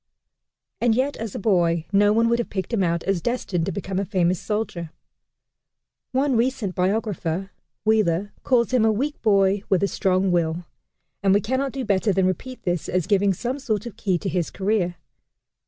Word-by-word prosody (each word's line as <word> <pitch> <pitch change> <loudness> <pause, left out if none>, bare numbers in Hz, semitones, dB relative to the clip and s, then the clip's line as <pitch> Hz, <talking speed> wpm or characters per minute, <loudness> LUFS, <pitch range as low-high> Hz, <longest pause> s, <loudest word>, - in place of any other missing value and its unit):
And 235 -2 +3
yet, 270 +4 0
as 220 -3 -5
a - - -2
boy, 170 -5 +2
no 205 +1 +5
one 230 +2 +3
would 235 0 +2
have 240 - -2
picked 190 +3 -4
him 220 - +2
out 170 -2 0
as 190 -2 0
destined 190 -8 -1
to - - 0
become 190 0 -3
a - - 0
famous 185 -3 +1
soldier. 210 -6 -3 1.2
One 270 0 +1
recent 235 -4 0
biographer 190 -2 -1 0.3
(Wheeler) 205 -3 +2
calls 240 -3 +2
him 250 -3 +4
"a 220 - +4
weak 280 +8 -2
boy 195 -1 +3
with 190 -1 +2
a - - +3
strong 190 -1 +1
will," 170 0 0 0.6
and 195 0 +4
we - - +5
cannot 260 +6 -1
do 265 -1 -4
better 205 +1 +2
than 190 0 +2
repeat 245 +8 -3
this 175 -3 -1
as 180 -3 0
giving 200 -1 +3
some 245 +9 -3
sort 215 -6 -2
of 235 - -7
key 200 -5 0
to 195 - -5
his 180 -4 -1
career. 190 -3 0
200 Hz, 190 wpm, -23 LUFS, 185-230 Hz, 1.2 s, no